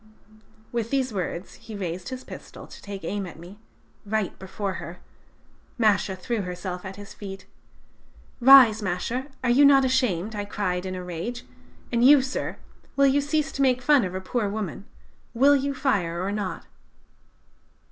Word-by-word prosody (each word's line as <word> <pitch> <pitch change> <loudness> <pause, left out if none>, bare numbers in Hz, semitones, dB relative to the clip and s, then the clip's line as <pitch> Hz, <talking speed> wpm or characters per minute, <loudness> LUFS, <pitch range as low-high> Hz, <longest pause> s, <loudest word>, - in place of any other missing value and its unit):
"With 230 -2 -2
these 265 -3 0
words 180 -1 -4
he 220 - -10
raised 180 -1 -4
his 260 0 -6
pistol - - -10
to - - -13
take 200 -2 -8
aim 195 +3 -3
at 175 - -11
me 180 +5 -12 0.4
right 215 -2 -2
before 190 +1 -4
her! 170 +1 -8 0.8
Masha 205 -4 +2
threw 215 +4 -3
herself 180 0 -5
at 190 0 -7
his 205 0 -10
feet. 195 -2 -9 0.9
"'Rise, 245 -4 +8
Masha; 220 +8 -2 0.2
are 245 - +2
you 270 +4 +5
not 275 -1 +6
ashamed!' 225 -6 0
I 205 - -2
cried 190 -3 -2
in 185 - -4
a 180 - -5
rage: 180 +8 -5 0.5
'and 235 -1 +2
you, 275 +1 +7
sir, 265 - -4 0.4
will 275 - +4
you 275 +1 +4
cease 290 -1 -1
to 275 - -3
make 255 -2 +2
fun 285 -2 +5
of 185 -1 -4
a 185 - -3
poor 210 +2 -1
woman? 200 -2 -5 0.5
Will 280 +4 +6
you 280 0 -1
fire 185 -11 0
or 195 - -2
not?' 205 -2 -4
210 Hz, 165 wpm, -25 LUFS, 185-260 Hz, 0.9 s, Rise